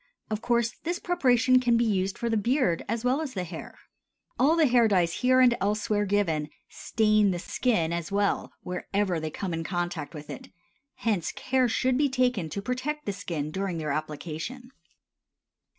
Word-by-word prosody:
Of 215 0 -2
course, 235 -1 +1
this 345 +2 -1
preparation 255 -9 +3
can 240 -2 +3
be 235 - +2
used 195 -3 0
for 235 - -2
the 225 - +1
beard 220 - +1
as 230 +2 -2
well 260 +5 +2
as 280 -6 -5
the 185 - -1
hair. 170 -2 -8 0.6
All 285 +6 +4
the 325 -2 +4
hair 240 -3 +4
dyes 180 -5 +2
here 255 0 +4
and 245 -2 +5
elsewhere 205 +1 0
given 165 -7 0 0.2
stain 215 -2 +2
the 180 - -1
skin 175 -3 0
as 170 0 -4
well 200 0 0
wherever 180 0 -1
they 155 0 -3
come 180 +3 -4
in 165 0 -2
contact 175 -2 -3
with 150 0 -8
it; 135 - -9 0.5
hence 205 -8 -1
care 255 -1 +1
should 255 +2 +1
be 290 -1 +3
taken 250 -10 0
to 200 +5 -5
protect 265 +6 -3
the 205 - -2
skin 165 -6 -4
during 190 -1 -2
their 155 -2 -2
application. 160 - -5
210 Hz, 180 wpm, -27 LUFS, 175-250 Hz, 0.6 s, and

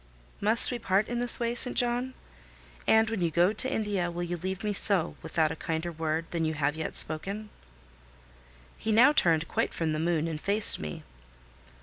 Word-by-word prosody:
"Must 220 +5 +3
we 245 - -4
part 200 -1 0
in 240 0 -3
this 245 -1 +4
way, 235 0 -1
St. 245 +1 +3
John? 245 +1 0 0.7
And 220 0 +4
when 225 -5 -3
you 170 - +1
go 175 +5 +2
to 260 +5 -2
India, 205 -7 -2
will 175 +1 -5
you 175 0 -4
leave 185 +3 -6
me 210 -1 -2
so, 190 -4 +1
without 155 -2 -1
a - - -5
kinder 165 +1 -4
word 160 0 -3
than 170 -1 -2
you 160 0 -2
have 145 0 -1
yet 160 0 -4
spoken?" 200 +7 +1 1.3
He 220 - -3
now 245 +7 +5
turned 165 - +2
quite - - -2
from 160 -2 -2
the 155 - -3
moon 165 -1 -1
and 155 -2 -6
faced 205 +1 +4
me. 75 -1 -7
180 Hz, 195 wpm, -27 LUFS, 160-220 Hz, 1.3 s, now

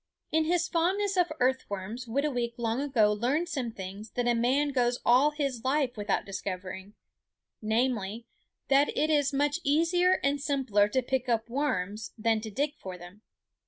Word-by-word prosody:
In 320 0 +2
his 340 +1 +1
fondness 380 +4 +1
for 350 -4 +1
earthworms 245 -3 -1
Whitooweek 245 -2 -1
long 235 +2 -1
ago 230 -7 +3
learned 265 +11 0
some 265 -6 -2
things 195 +2 -8
that 245 -1 0
a 240 - +4
man 255 +5 +2
goes 245 -3 +1
all 255 +5 +5
his 275 -6 -3
life 265 -2 +1
without 205 -2 -1
discovering, 190 0 -6 0.7
namely, 225 -1 -1 0.4
that 275 +1 +4
it 310 +1 +2
is 290 -2 +2
much 290 +3 +1
easier 345 +5 +3
and 280 0 +1
simpler 260 -8 +2
to 260 +4 0
pick 260 0 -1
up 230 0 0
worms 210 -7 -2
than 225 0 +1
to 220 - -6
dig 285 +8 -1
for 185 -1 -7
them. 180 +4 -13
250 Hz, 160 wpm, -29 LUFS, 215-290 Hz, 0.7 s, all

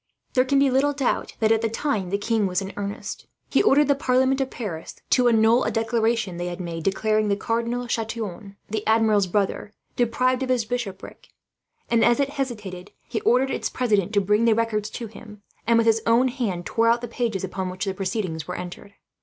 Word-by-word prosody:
There 255 -1 +3
can 275 +1 +2
be 275 -1 +4
little 280 +3 +2
doubt 275 -3 -1
that, 220 0 +3
at 225 -1 +3
the 225 - 0
time, 225 -5 -2
the 200 - 0
king 215 0 0
was 180 -1 0
in 195 0 -6
earnest. 200 0 -5 0.2
He - - +4
ordered 295 -7 +4
the 285 - +5
parliament 260 0 +2
of 265 - -1
Paris 180 -12 -6 0.2
to 250 -1 +4
annul 225 +1 +4
a - - 0
declaration 225 -4 0
they 175 0 -3
had 175 0 -5
made, 170 -2 -5
declaring 215 +3 +1
the 200 - +2
Cardinal 235 +3 -2
Chatillon, 220 -4 -4
the 215 0 -2
Admiral's 220 -3 +3
brother, 205 +2 -1 0.2
deprived 250 +2 +1
of 260 - -2
his 250 -3 +1
bishopric; 220 -5 -6 0.6
and 235 -1 +3
as 240 +1 +4
it 280 0 +1
hesitated, 210 -10 -5 0.2
he 230 - -3
ordered 255 +3 +3
its - - -2
president 210 -6 +1
to 205 - +4
bring 210 +4 +2
the 225 -2 +4
records 215 -2 -1
to 235 - -6
him, 210 -1 -12 0.2
and 230 0 +5
with 230 - +3
his 225 0 +3
own 240 +3 +4
hand 215 -9 -3
tore 230 0 +1
out 235 +1 +3
the 240 - -4
pages 230 -4 -2
upon 190 -1 -3
which 185 +3 -4
the 195 - -1
proceedings 185 -4 -3
were 180 - -4
entered. 180 +3 -8
225 Hz, 210 wpm, -24 LUFS, 200-245 Hz, 0.6 s, the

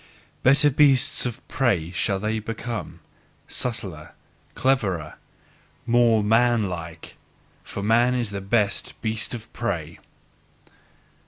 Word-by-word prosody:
Better 145 +3 +5
beasts 135 -3 +4
of 120 - -8
prey 95 - 0
shall 95 +2 0
they 110 +2 -2
thus 110 - -14
become, 115 0 -5 0.5
subtler, 95 -10 -5 0.4
cleverer, 95 - 0 0.7
MORE 115 -2 +4
MAN 115 0 +3
LIKE: 80 -2 -8 0.4
for 100 - -6
man 120 +4 +3
is 120 -5 -2
the 100 -1 -4
best 100 0 0
beast 110 +2 -1
of 115 -1 -11
prey. 85 -9 -4
110 Hz, 110 wpm, -24 LUFS, 100-120 Hz, 0.7 s, Better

